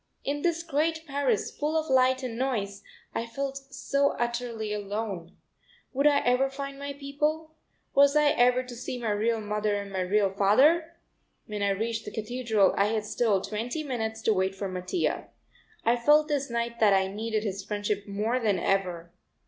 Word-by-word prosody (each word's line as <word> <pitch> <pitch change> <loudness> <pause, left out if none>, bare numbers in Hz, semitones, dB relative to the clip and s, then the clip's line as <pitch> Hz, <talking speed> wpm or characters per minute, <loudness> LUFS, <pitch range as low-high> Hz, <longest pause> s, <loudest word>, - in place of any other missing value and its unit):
In 290 +1 -2
this 335 0 0
great 320 +1 0
Paris 275 -7 0
full 305 +2 0
of 315 - -4
light 260 0 +3
and 245 -3 -4
noise 220 -6 -2 0.3
I 230 - -2
felt 275 +3 -4
so 280 +1 +1
utterly 235 -3 -2
alone. 205 -4 -4 0.6
Would 280 +3 +3
I 285 -1 +4
ever 250 +2 +2
find 275 0 -6
my 280 0 -4
own - - -18
people? 300 +3 -2 0.4
Was 280 +1 +5
I 300 -1 +5
ever 250 0 +3
to 250 -1 -9
see 250 +1 -5
my 230 -3 -2
real 220 +2 +1
mother 210 0 -1
and 200 -1 -4
my 190 - -1
real 195 +1 +2
father? 295 - +3 0.5
When 210 -1 -5
I 200 - +2
reached 225 +3 -2
the 210 - -6
Cathedral 220 -2 +1
I 200 - +3
had 215 0 -1
still 210 -3 +1
twenty 235 +10 -3
minutes 220 -5 -3
to 220 - +3
wait 190 0 0
for 195 0 -3
Mattia. 185 - -2 0.6
I 235 +1 +4
felt 295 +5 +4
this 285 -2 -1
night 235 0 -2
that 210 -3 +5
I 190 0 +3
needed 215 +2 -2
his 195 -2 -3
friendship 205 0 -2
more 215 +5 0
than 210 -5 +1
ever. 175 -2 -1
235 Hz, 180 wpm, -28 LUFS, 205-275 Hz, 0.6 s, Was